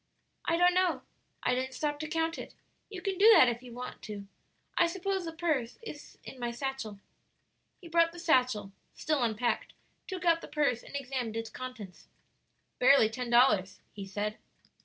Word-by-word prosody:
"I 335 Hz, -, +2 dB
don't 355 Hz, +1 st, +5 dB
know. 365 Hz, -2 st, +1 dB, 0.4 s
I 250 Hz, -, +2 dB
didn't 260 Hz, +1 st, -2 dB
stop 295 Hz, -1 st, -2 dB
to 310 Hz, -, -4 dB
count 325 Hz, +1 st, -1 dB
it. -, -, -9 dB, 0.3 s
You 380 Hz, -3 st, -8 dB
can 385 Hz, -2 st, -2 dB
do 435 Hz, +3 st, +9 dB
that, 255 Hz, -, +8 dB
if 240 Hz, 0 st, -1 dB
you 250 Hz, -1 st, -11 dB
want 250 Hz, +1 st, -7 dB
to. 205 Hz, -2 st, -7 dB, 0.5 s
I 345 Hz, -, +4 dB
suppose 380 Hz, +1 st, -2 dB
the 330 Hz, -, -4 dB
purse 310 Hz, -8 st, -1 dB
is 300 Hz, -10 st, -10 dB
in 260 Hz, -, -10 dB
my 240 Hz, -1 st, -2 dB
satchel." 240 Hz, -4 st, -4 dB, 0.8 s
He 350 Hz, -, -11 dB
brought 335 Hz, 0 st, +3 dB
the 345 Hz, -, -13 dB
satchel 255 Hz, -, +2 dB, 0.2 s
still 305 Hz, -3 st, 0 dB
unpacked 235 Hz, +1 st, 0 dB, 0.3 s
took 370 Hz, -3 st, -5 dB
out 335 Hz, -1 st, +4 dB
the -, -, -8 dB
purse 280 Hz, -6 st, +1 dB
and -, -, -11 dB
examined 255 Hz, -5 st, -3 dB
its 225 Hz, 0 st, -4 dB
contents. 240 Hz, -8 st, -8 dB, 0.7 s
"Barely 250 Hz, -4 st, +6 dB
ten 245 Hz, +1 st, -4 dB
dollars," 210 Hz, -6 st, +4 dB
he 200 Hz, -2 st, -7 dB
said. 210 Hz, +2 st, -3 dB
260 Hz, 180 wpm, -30 LUFS, 235-335 Hz, 0.8 s, do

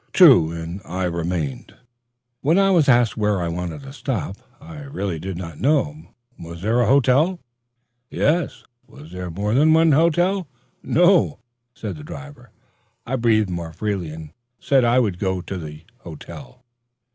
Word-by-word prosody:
True; 130 Hz, -, +7 dB
and 85 Hz, +3 st, -6 dB
I 95 Hz, 0 st, -4 dB
remained, 85 Hz, -6 st, -3 dB
and -, -, -28 dB, 0.6 s
when 160 Hz, +6 st, +2 dB
I 195 Hz, 0 st, +4 dB
was 165 Hz, -7 st, +3 dB
asked 120 Hz, -3 st, +3 dB
where 105 Hz, -2 st, +1 dB
I 85 Hz, -1 st, -2 dB
wanted 90 Hz, -, -5 dB
to 135 Hz, 0 st, -10 dB
stop, 120 Hz, -9 st, -4 dB, 0.2 s
I 155 Hz, +1 st, -11 dB
really 100 Hz, -, -4 dB
did 95 Hz, +1 st, -5 dB
not 85 Hz, -4 st, -8 dB
know. 150 Hz, +2 st, 0 dB, 0.3 s
Was 85 Hz, +1 st, -9 dB
there 115 Hz, +4 st, +2 dB
a -, -, +2 dB
hotel? 140 Hz, +7 st, +3 dB, 0.7 s
Yes. 160 Hz, +2 st, 0 dB, 0.2 s
Was 75 Hz, +3 st, -14 dB
there 90 Hz, 0 st, -6 dB
more 100 Hz, +5 st, -2 dB
than 155 Hz, +5 st, +4 dB
one 160 Hz, 0 st, +4 dB
hotel? 175 Hz, +4 st, +2 dB, 0.3 s
No. 175 Hz, -3 st, +3 dB, 0.5 s
I 85 Hz, -, -9 dB
breathed 110 Hz, -5 st, +2 dB
more 85 Hz, -2 st, -5 dB
freely, 100 Hz, -5 st, -3 dB
and 80 Hz, -1 st, -9 dB, 0.3 s
said 135 Hz, -2 st, +2 dB
I 120 Hz, +1 st, +3 dB
would 105 Hz, -8 st, +1 dB
go 95 Hz, -1 st, -1 dB
to 95 Hz, +2 st, -6 dB
the 75 Hz, -2 st, -9 dB, 0.2 s
hotel. 125 Hz, 0 st, -11 dB
105 Hz, 150 wpm, -21 LUFS, 85-145 Hz, 0.7 s, True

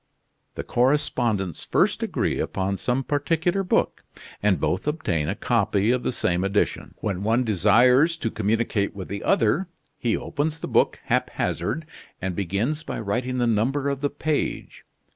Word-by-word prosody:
The -, -, -4 dB
correspondents 120 Hz, -, 0 dB
first -, -, +1 dB
agree -, -, -1 dB
upon 95 Hz, +1 st, -1 dB
some 125 Hz, +5 st, 0 dB
particular 165 Hz, +7 st, 0 dB
book; 185 Hz, -, 0 dB, 0.4 s
and 100 Hz, -5 st, +2 dB
both 90 Hz, -, -1 dB
obtain 90 Hz, -, -1 dB
a -, -, -1 dB
copy 100 Hz, +3 st, +1 dB
of 125 Hz, 0 st, +1 dB
the -, -, -1 dB
same 90 Hz, -6 st, 0 dB
edition. 100 Hz, +1 st, -1 dB
When 100 Hz, -3 st, -2 dB
one 115 Hz, +4 st, +2 dB
desires 125 Hz, -, +4 dB
to 115 Hz, -, -2 dB
communicate 110 Hz, -1 st, 0 dB
with 95 Hz, -2 st, -7 dB
the 100 Hz, 0 st, -5 dB
other, 145 Hz, -, +2 dB, 0.3 s
he 115 Hz, -2 st, +1 dB
opens 155 Hz, +2 st, -2 dB
the -, -, -5 dB
book -, -, +2 dB
haphazard, 160 Hz, +1 st, -1 dB, 0.3 s
and 95 Hz, -1 st, -3 dB
begins 100 Hz, -, -1 dB
by 165 Hz, -, -5 dB
writing 120 Hz, +4 st, -2 dB
the 120 Hz, -, +2 dB
number 125 Hz, +6 st, +1 dB
of 140 Hz, -1 st, -3 dB
the 145 Hz, -, +1 dB
page. 150 Hz, +1 st, -3 dB
120 Hz, 155 wpm, -24 LUFS, 100-145 Hz, 0.4 s, desires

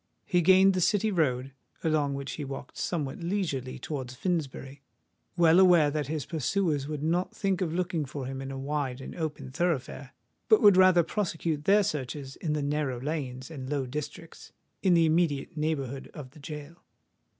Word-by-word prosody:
He 180 Hz, -2 st, +2 dB
gained 190 Hz, +3 st, +6 dB
the 185 Hz, -, 0 dB
City 210 Hz, +4 st, +2 dB
Road, 135 Hz, -7 st, 0 dB, 0.3 s
along 150 Hz, -3 st, +1 dB
which 140 Hz, 0 st, -5 dB
he 150 Hz, -, -5 dB
walked 135 Hz, 0 st, -7 dB
somewhat 150 Hz, -6 st, -3 dB
leisurely 170 Hz, -8 st, -2 dB
towards 130 Hz, -4 st, -5 dB
Finsbury—well 145 Hz, +2 st, -1 dB
aware 175 Hz, -6 st, +6 dB
that 150 Hz, -2 st, -2 dB
his 155 Hz, -1 st, -3 dB
pursuers 160 Hz, -2 st, 0 dB
would 150 Hz, -1 st, -4 dB
not 175 Hz, +3 st, 0 dB
think 195 Hz, -3 st, 0 dB
of 170 Hz, -4 st, 0 dB
looking 170 Hz, -2 st, -1 dB
for 135 Hz, 0 st, -6 dB
him 135 Hz, +1 st, -5 dB
in 135 Hz, -, -6 dB
a 135 Hz, -, -5 dB
wide 135 Hz, -2 st, -2 dB
and 135 Hz, -, -8 dB
open 150 Hz, -5 st, -4 dB
thoroughfare, 140 Hz, -4 st, -2 dB, 0.4 s
but 435 Hz, -, +7 dB
would 205 Hz, -2 st, +7 dB
rather 185 Hz, -2 st, +6 dB
prosecute 165 Hz, -5 st, -2 dB
their 205 Hz, +1 st, +5 dB
searches 135 Hz, -3 st, -4 dB
in 155 Hz, -3 st, -2 dB
the 150 Hz, -1 st, -1 dB
narrow 145 Hz, -3 st, -1 dB
lanes 130 Hz, -2 st, -4 dB
and 130 Hz, -4 st, -7 dB
low 145 Hz, -2 st, -1 dB
districts 150 Hz, +5 st, -7 dB, 0.3 s
in 185 Hz, -3 st, +4 dB
the 165 Hz, -1 st, +5 dB
immediate 160 Hz, -4 st, +1 dB
neighbourhood 140 Hz, -4 st, -2 dB
of 135 Hz, -4 st, -8 dB
the 150 Hz, -, -16 dB
gaol. 150 Hz, +2 st, -8 dB
150 Hz, 170 wpm, -28 LUFS, 135-175 Hz, 0.4 s, but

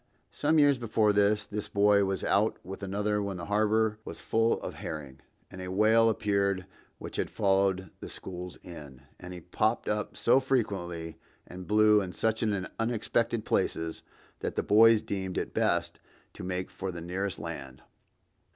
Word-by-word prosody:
Some 155 Hz, +2 st, +1 dB
years 145 Hz, -3 st, +5 dB
before 110 Hz, -2 st, +2 dB
that, 105 Hz, +1 st, +2 dB
this 105 Hz, 0 st, -3 dB
boy 100 Hz, 0 st, +4 dB
was 95 Hz, 0 st, -2 dB
out 105 Hz, +3 st, +2 dB
with 95 Hz, +2 st, -8 dB
another 105 Hz, +2 st, -1 dB
when 100 Hz, -2 st, -3 dB
the 85 Hz, -, -6 dB
harbor 105 Hz, +1 st, +1 dB
was -, -, -8 dB
full 115 Hz, +1 st, +1 dB
of -, -, -5 dB
herring, 70 Hz, -4 st, -7 dB, 0.3 s
and 95 Hz, -, -8 dB
a 90 Hz, -, -5 dB
whale 110 Hz, +4 st, +4 dB
appeared 100 Hz, -3 st, 0 dB, 0.3 s
which -, -, -7 dB
had -, -, -1 dB
followed 95 Hz, -2 st, +1 dB
the -, -, -8 dB
schools 90 Hz, -1 st, -8 dB
in. 70 Hz, -6 st, -11 dB, 0.2 s
And 90 Hz, -, -9 dB
he 90 Hz, -1 st, -8 dB
popped 110 Hz, +7 st, -1 dB
up 105 Hz, 0 st, -2 dB
so 125 Hz, +3 st, +4 dB
frequently 95 Hz, -11 st, -2 dB, 0.3 s
and 90 Hz, 0 st, -10 dB
blew 105 Hz, 0 st, +5 dB
in 90 Hz, -2 st, -5 dB
such 110 Hz, 0 st, 0 dB, 0.4 s
unexpected 115 Hz, 0 st, 0 dB
places 80 Hz, 0 st, -1 dB, 0.4 s
that -, -, -4 dB
the -, -, 0 dB
boys 110 Hz, +1 st, +6 dB
deemed 95 Hz, -2 st, -4 dB
it -, -, -3 dB
best -, -, 0 dB, 0.3 s
to -, -, -9 dB
make 90 Hz, 0 st, -3 dB
for 95 Hz, -1 st, -5 dB
the 85 Hz, -, -7 dB
nearest 95 Hz, +3 st, -3 dB
land. 70 Hz, -5 st, -8 dB
100 Hz, 165 wpm, -29 LUFS, 90-110 Hz, 0.4 s, boys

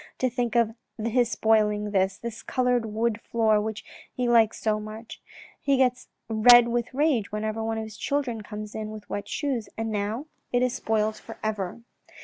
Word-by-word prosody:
"To 255 Hz, -1 st, 0 dB
think 240 Hz, -2 st, -1 dB
of 230 Hz, -2 st, +3 dB, 0.2 s
his 230 Hz, +2 st, +1 dB
spoiling 215 Hz, -2 st, +2 dB
like 210 Hz, 0 st, -5 dB
this, 190 Hz, 0 st, +2 dB
this 235 Hz, -1 st, -6 dB
coloured 250 Hz, -3 st, +1 dB
wood 220 Hz, +1 st, -1 dB
floor 220 Hz, -2 st, +2 dB
which 215 Hz, -1 st, -5 dB, 0.3 s
he 250 Hz, -1 st, -2 dB
likes 230 Hz, -2 st, +4 dB
so 215 Hz, -1 st, +1 dB
much; 215 Hz, +2 st, -9 dB, 0.4 s
he 280 Hz, -2 st, +2 dB
gets 255 Hz, -1 st, +1 dB, 0.2 s
red 235 Hz, +2 st, +7 dB
with 240 Hz, 0 st, -1 dB
rage 265 Hz, -7 st, +1 dB
whenever 215 Hz, +1 st, -2 dB
one 225 Hz, 0 st, -1 dB
of 220 Hz, -, -2 dB
his 220 Hz, -1 st, -9 dB
children 265 Hz, -6 st, -1 dB
comes 210 Hz, 0 st, -7 dB
into 215 Hz, -1 st, -4 dB
it -, -, -7 dB
with 215 Hz, -1 st, -10 dB
wet 205 Hz, 0 st, -3 dB
shoes, 260 Hz, -4 st, -2 dB
and 225 Hz, 0 st, -2 dB
now 210 Hz, +6 st, -2 dB, 0.3 s
it 245 Hz, 0 st, +2 dB
is 250 Hz, -1 st, +1 dB
spoilt 215 Hz, -1 st, 0 dB
for 225 Hz, -, -11 dB
ever." 210 Hz, -1 st, -3 dB
225 Hz, 190 wpm, -26 LUFS, 215-240 Hz, 0.4 s, red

